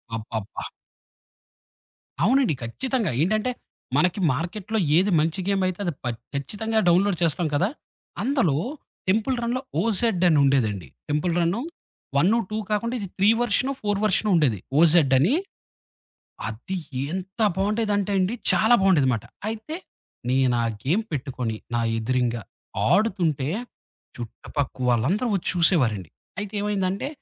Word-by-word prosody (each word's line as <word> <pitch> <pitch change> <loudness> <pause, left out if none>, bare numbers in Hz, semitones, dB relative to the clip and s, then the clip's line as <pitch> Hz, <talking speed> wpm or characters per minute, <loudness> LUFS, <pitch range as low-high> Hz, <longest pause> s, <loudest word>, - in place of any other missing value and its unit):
అబ్బబ్బ! 110 -2 -5 1.6
అవునండి. 255 - +3
ఖచ్చితంగా. 230 - -1
ఏంటంటే, 215 +8 +1 0.5
మనకి 180 +6 +2
మార్కెట్‌లో 185 - -3 0.2
ఏది 195 +3 +3
మంచి 160 +4 0
గేమ్ 195 -1 +1
అయితే 185 0 -4
అది 175 - -1
ప - - -9 0.3
ఖచ్చితంగా 210 +11 -1
డౌన్‌లోడ్ 180 +2 +4
చేస్తాం 165 +1 +2
కదా! 185 +8 +2 0.5
అందులో 245 - +2 0.5
టెంపుల్ 220 +7 +2
రన్‌లో 245 +2 -1 0.2
ఓజెడ్ 220 -2 +1
అనుండేదండి. 135 - +2 0.2
టెంపుల్ 150 +4 0
రన్ను, 175 +7 +1 0.6
వన్ను, 190 +11 +4
2 215 - -3
కాకుండా 230 +4 0
ఇది 200 - -4
3 200 +2 +4
వర్షనో, 240 +3 +1
4 205 -1 0
వర్షనో 215 +1 +2
ఉండేది, 135 - +2 0.2
ఓజెడ్ 160 -4 +5
అని. 170 - +3 1.1
అది 120 - -5 0.3
ఎంత 190 +3 -6 0.2
బావుండేదంటే 205 0 0
అండి 185 +4 +1 0.2
చాలా 220 +2 +4
బాగుండేదిమాట. 140 - +3 0.2
అయితే, 225 +8 -4 0.5
నేనా 125 -2 +2 0.2
గేమ్ 180 +12 +1
పెట్టుకొని 125 -5 -3 0.2
నా 120 - +1 0.2
ఎదురింగ 120 +1 0 0.6
ఆడుతుంటే, 175 -10 +1 0.7
చుట్టుపక్క 130 +4 -4
వాళ్ళందరూ 145 - +1
వచ్చి 190 - -3
చూసేవారండి. 130 - +2 0.3
అయితే 205 0 -5
ఏమైందంటే, 200 0 -1
180 Hz, 115 wpm, -24 LUFS, 140-210 Hz, 1.6 s, ఓజెడ్